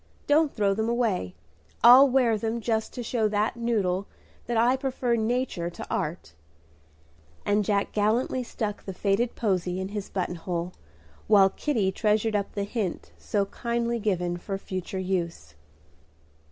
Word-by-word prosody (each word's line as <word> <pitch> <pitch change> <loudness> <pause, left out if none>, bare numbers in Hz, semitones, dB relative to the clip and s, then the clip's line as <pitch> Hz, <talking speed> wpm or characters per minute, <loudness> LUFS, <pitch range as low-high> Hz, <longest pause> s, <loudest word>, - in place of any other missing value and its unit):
Don't 295 0 +3
throw 200 -3 +1
them 220 +3 -1
away. 220 - 0 0.5
I'll 255 +4 +9
wear 250 -3 +3
them 225 +2 -2
just 220 -1 -1
to 245 - -4
show 225 -1 0
that 210 +2 0
noodle 205 -5 0 0.4
that 235 -1 0
I 240 +3 +4
prefer 260 -2 -1
nature 225 -6 -1
to 175 - -8
art;" 150 - -3 1.1
and 205 +1 +2
Jack 200 0 0
gallantly 220 +5 +1
stuck 215 -3 -4
the 190 - -6
faded 210 +6 0
posy 185 -4 -1
in 190 0 -3
his 205 -1 -5
button 180 -2 -3
hole, 175 +1 -4 0.5
while 195 -3 +6
Kitty 220 -10 0
treasured 215 +2 +1
up 200 -1 -1
the 200 - -2
hint 200 -3 -3
so 200 -2 0
kindly 235 +2 -2
given 180 -5 -1
for 195 +2 -4
future 185 -1 -5
use. 180 - -3
210 Hz, 150 wpm, -26 LUFS, 190-235 Hz, 1.1 s, I'll